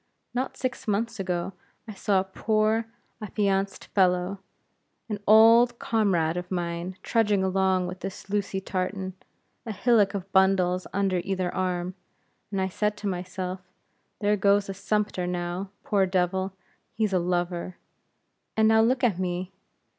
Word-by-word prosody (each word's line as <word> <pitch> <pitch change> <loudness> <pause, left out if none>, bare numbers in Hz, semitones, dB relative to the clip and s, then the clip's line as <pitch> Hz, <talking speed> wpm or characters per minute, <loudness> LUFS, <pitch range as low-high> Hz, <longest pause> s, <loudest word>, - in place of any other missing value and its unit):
Not 255 +2 -2
six 250 -3 -4
months 225 +2 -1
ago, 180 0 -2 0.3
I 215 - -6
saw 195 0 +1
a - - 0
poor 215 +3 0 0.3
affianced 195 -2 -1
fellow, 180 0 +2 0.7
an 210 -2 -3
old 230 +3 +7
comrade 180 -9 +1
of 180 0 -5
mine, 175 0 -3
trudging 210 -4 +2
along 190 -1 +2
with 180 +1 -6
his 195 0 -7
Lucy 200 -1 -1
Tartan, 190 0 -3 0.5
a 225 - -5
hillock 210 -1 +3
of 195 0 -5
bundles 190 -1 +3
under 195 -2 +1
either 185 -2 -2
arm; 180 -1 -1 0.6
and 195 - -2
I 190 - +1
said 210 +2 -1
to 210 - -4
myself 185 0 -4 0.6
There 205 0 +3
goes 200 0 +3
a - - -2
sumpter, 200 -2 -1
now; 180 +2 -3
poor 195 -2 +2
devil, 185 +1 0 0.4
he's 215 -2 0
a 185 - +3
lover. 175 0 -2 0.8
And 220 0 +5
now 220 0 +5
look 255 +4 +2
at 210 -7 +2
me! 180 0 -2
195 Hz, 145 wpm, -26 LUFS, 185-210 Hz, 0.8 s, old